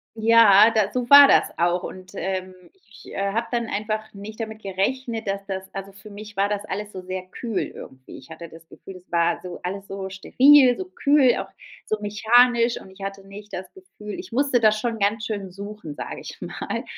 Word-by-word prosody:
Ja, 220 -2 +6
da 215 -3 +1
so 250 -1 -3
war 285 0 +10
das - - +2
auch. 175 +1 +1
Und, 185 0 -9
ähm, 185 -1 -4 0.3
ich 210 - -15
habe 200 +4 -1
dann 235 -1 -1
einfach 215 +1 -4
nicht 210 +3 -10
damit 220 -1 -6
gerechnet, 225 +5 -2
dass 200 0 -3
das 190 -1 -4
also, 195 0 -7
für 200 +2 -14
mich 210 0 -11
war 200 +1 +2
das 205 0 -3
alles 210 +1 -5
so 185 - -8
sehr 185 0 -5
kühl 225 +1 -4
irgendwie. 130 0 -12
Ich - - -15
hatte 160 0 -10
das 165 0 -15
Gefühl, 190 -1 -12
es 180 - -20
war 170 0 +1
so 180 -1 -8
alles 195 +2 -5
so 195 -1 -6
steril, 255 +6 +5
so 375 - -5
kühl, 285 -7 +3
auch - - -4 0.4
so 215 - -1
mechanisch. 235 +3 +3
Und 190 - -14
ich 195 +1 -16
hatte 195 0 -6
nicht 205 +1 -12
das 185 - -7
Gefühl 210 - -10
ich 185 - -9
musste 270 -1 +2
das 215 -1 +3
schon 230 -1 -3
ganz 210 +2 0
schön 200 -3 -4
suchen, 200 -5 -9
sage - - -7
ich - - -10
mal. - - -5
205 Hz, 205 wpm, -23 LUFS, 190-230 Hz, 0.4 s, war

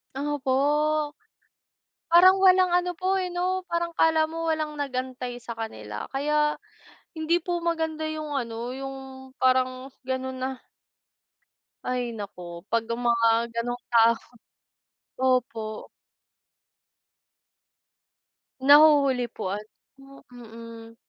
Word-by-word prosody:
Opo. 280 -2 -1 1.5
Parang 370 +3 +7
walang 370 -1 +5
ano 355 0 +1
po 380 +2 0
eh 370 - -1
'no? 360 +1 -1
Parang 340 0 -1
kala 320 -1 +3
mo 330 +1 -3
walang 315 -1 0
nag-antay 255 -2 -4
sa 235 - -7
kanila, 110 - -6
kaya 300 +2 +1 0.6
hindi 315 +2 +1
po 350 -1 -1
maganda 320 -2 -1
yung 310 -1 -5
ano, 235 -1 -4
yung 270 0 -6 0.4
parang 255 0 +1 0.2
ganun 260 0 -3
na 260 +1 -1 1.3
Ay 245 -2 -2
naku 180 -4 -8
'pag 230 0 +2
ang 230 +1 -3
mga 230 -1 +3 0.2
ganung 245 +1 -3
tao 230 0 +6 1.0
opo. 230 -4 -1 2.8
Nahuhuli 285 -3 +6
po - - -6
ano? 270 +6 -11
Mm. 230 -1 -11
265 Hz, 100 wpm, -26 LUFS, 235-315 Hz, 2.8 s, Parang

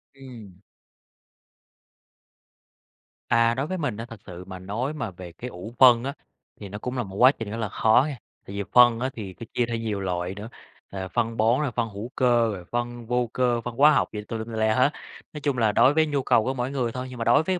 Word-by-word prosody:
Ừm. 115 -9 -12 2.7
À, 115 0 +4
đối 135 +4 -2
với 185 +2 -3
mình 145 - -2
á 115 - -5
thật 115 -4 -12
sự 90 -1 -9
mà 95 -1 -8
nói 110 +10 -3
mà 125 -9 -4
về 90 -1 -10
cái 120 +9 -8
ủ 100 +3 -9
phân 120 -2 +7
á, 140 - -3 0.5
thì 100 - -8
nó 100 - -6
cũng 125 +4 -5
là 125 - 0
một 95 -1 -10
quá 125 +6 +7
trình 115 -6 -7
rất 115 - -4
là 110 -3 -2
khó 110 +6 +4
nghe. 145 -4 -5 0.3
Tại 100 - -7
vì 100 - -2
phân 120 -2 +7
á 130 +2 -1
thì 100 -6 -7
phải 115 - -8
chia 120 - +1
theo 115 0 -3
nhiều 110 -3 -3
loại 90 0 -2
nữa, 105 +3 -8 0.4
ờ, 95 -1 -5
phân 115 +1 -1
bón, 115 +4 +3
rồi 145 -4 -1
phân 115 -1 -1
hữu 105 +3 -7
cơ, 120 -3 +3
rồi 90 -3 -8
phân 120 0 -3
vô 125 0 0
cơ, 120 -2 +1
phân 120 0 -6
hóa 145 +4 +6
học - - +2
gì 105 - -4
tùm 115 - -4
lum 110 - -4
tùm 115 - -8
la 110 0 +2
hết, 130 +3 +4 0.4
nói 150 - -7
chung 140 -3 0
là 110 -3 +3
đối 130 +6 +5
với 160 +1 +3
nhu 145 -3 -1
cầu 115 - +3
của 130 +4 -1
mỗi 125 0 -3
người 125 -4 -1
thôi. 125 +2 -5
Nhưng 125 - -9
mà - - -1
đối 120 +6 +5
với 185 +2 -1
115 Hz, 250 wpm, -25 LUFS, 105-130 Hz, 2.7 s, phân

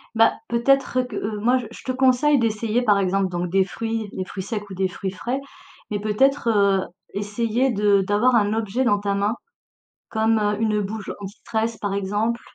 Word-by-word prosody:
Bah, 225 0 +5
peut-être, 255 +3 +2
heu, - - +2
que, 235 -4 -8
heu, 210 +1 -3
moi 245 +4 +3
je - - -12
te 260 - -2
conseille 260 +2 +3
d'essayer 225 +1 0
par 210 -4 +3
exemple 190 0 +1
donc 175 0 -3
des 195 0 +4
fruits, 225 +1 -4
des 185 - -3
fruits 190 0 -6
secs 205 0 -4
ou - - -7
des 190 0 0
fruits 190 +1 -5
frais, 245 +8 -3 0.5
mais 205 - -1
peut-être, 235 +5 +2
heu, 200 -3 +3 0.3
essayer 230 +5 0
de 205 -2 +3
d'avoir 210 +6 +2
un 210 -1 +3
objet 225 +3 -1
dans 205 -4 +2
ta 200 -1 -1
main, 200 +2 +1 0.8
comme, 220 0 +2
heu, 210 0 +1
une 215 -2 +1
bouge 205 +1 -4
anti-stress 220 +3 -3
par 200 -1 -2
exemple. 205 +4 -1
210 Hz, 190 wpm, -23 LUFS, 200-235 Hz, 0.8 s, Bah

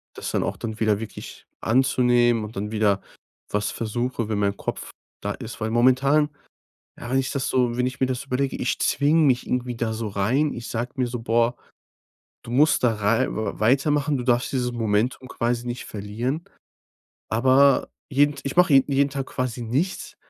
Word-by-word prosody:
das - - -5
dann - - 0
auch - - -3
dann 110 -1 -6
wieder 110 -2 +2
wirklich 110 -1 -9
anzunehmen 120 -1 +3
und 105 +1 -8
dann 105 +2 -4
wieder 105 -3 +2 0.5
was 105 0 -1
versuche, 120 0 -3
wenn 105 -2 -1
mein 100 -1 +1
Kopf - - -5 0.3
da - - -2
ist. - - -8
Weil 110 - -2
momentan 135 +5 +3 0.7
ja, 120 - -7
wenn 135 - +3
ich 130 - -2
das 135 -2 -2
so 125 -2 +1
wenn 125 - +1
ich 130 0 -4
mir 130 - +2
das 125 -1 -3
überlege: 135 0 -1
ich - - -2
zwinge 150 +4 +3
mich 130 -5 +3
irgendwie 125 -1 -2
da 115 -1 -2
so 110 -1 -3
rein. 120 +10 +1
Ich 115 - -7
sage 120 +2 -3
mir 130 -2 0
so: 120 0 -4
„Boah, 115 +1 +1 0.9
du 120 - -8
musst 145 +2 +3
da 115 -2 +4
rei 105 +2 +2
w 110 - -4
weitermachen. 140 +5 +2
Du 125 - -4
darfst 120 0 +1
dieses 125 -2 0
Momentum 115 +3 -1
quasi 120 0 -2
nicht 120 0 -5
verlieren.“ 115 +10 -4 0.9
Aber 130 +4 +4 0.2
jeden 145 +1 +3
T 140 - -9
ich 140 - -3
mache 180 -4 +5
je 135 - +7
jeden 140 0 +2
Tag 135 -1 -4
quasi 125 -1 -3
nichts 135 +12 -2
125 Hz, 190 wpm, -24 LUFS, 115-135 Hz, 0.9 s, je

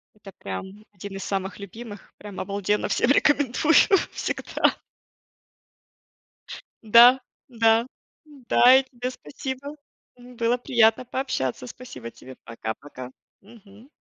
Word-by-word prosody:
это 200 -2 -14
прям 190 - -8
один 200 0 -9
из 195 - -6
самых 195 -1 -4
любимых, 205 +2 -11
прям 205 -2 -8
обалденно 205 +1 -2
всем 235 - +1
рекомендую 290 +1 +2 0.4
всегда. - - -1 2.1
Да, 240 +4 +7 0.3
да, 230 -1 +2 0.4
да, 260 -3 +4
и 270 - -1
тебе 250 -1 -6
спасибо, 265 - -8 0.4
м, 245 0 -15
было 235 +1 +1
приятно 235 -1 +2
пообщаться, 240 - -3
спасибо 125 - -10
тебе, 130 +2 -14
пока-пока. 125 +3 -8 0.3
Мгм. 215 +3 -18
225 Hz, 105 wpm, -24 LUFS, 195-250 Hz, 2.1 s, Да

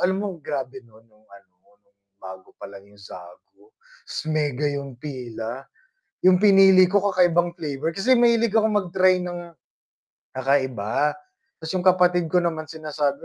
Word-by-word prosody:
alam 190 +1 +1
mo 190 -6 -5
grabe 135 -2 -5
nun 115 -2 -22
nung 110 -1 -30
ano, 100 -2 -19 0.3
nung 100 0 -43 0.2
bago 95 -1 -13
palang 100 0 -12
yung 105 - -22
Zagu, 90 - -15 0.4
ta's - - -5
mega 150 -3 -1
yung 140 -3 -6
pila? 125 -2 -7 0.6
Yung 185 -1 +5
pinili 195 -2 +6
ko 200 - +4
kakaibang 175 -1 +2
flavor, 155 -1 -4
kasi 250 +6 +2
mahilig 235 -2 +3
ako 220 0 +3
mag-try 185 -2 +1
ng 175 -1 -7 0.9
kakaiba. 130 0 0 0.5
Tas 160 +2 -6
yung 185 -1 -2
kapatid 180 -2 +3
ko 180 +2 +2
naman 155 -2 -3
sinasabi, 150 -3 -4
155 Hz, 145 wpm, -23 LUFS, 125-185 Hz, 0.9 s, pinili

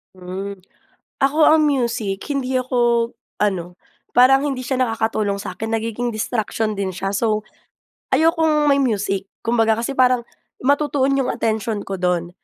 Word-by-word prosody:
Mm. 185 +2 -6 0.6
Ako 275 +3 +1
ang 310 0 +5
music, 235 -8 -1
hindi 265 -2 -1
ako 240 -2 +1 0.3
ano, 180 -4 -1 0.4
parang 270 +3 +5
hindi 260 -3 -3
siya 260 0 -2
nakakatulong 220 -4 0
sa'kin. 220 +2 -5
Nagiging 225 +2 -2
distraction 220 -1 -2
din 195 -1 -2
siya. 195 +1 -2
So, 215 +1 0 0.7
ayokong 320 -2 +3
may 280 - +4
music. 200 -6 0
Kumbaga 225 -1 +2
kasi, 275 +3 -4
parang 250 -1 +4 0.4
matutuon 280 0 +2
yong 265 -2 0
atensyon 220 -1 -1
ko 195 - -5
do'n. 180 -1 0
230 Hz, 135 wpm, -20 LUFS, 205-265 Hz, 0.7 s, ang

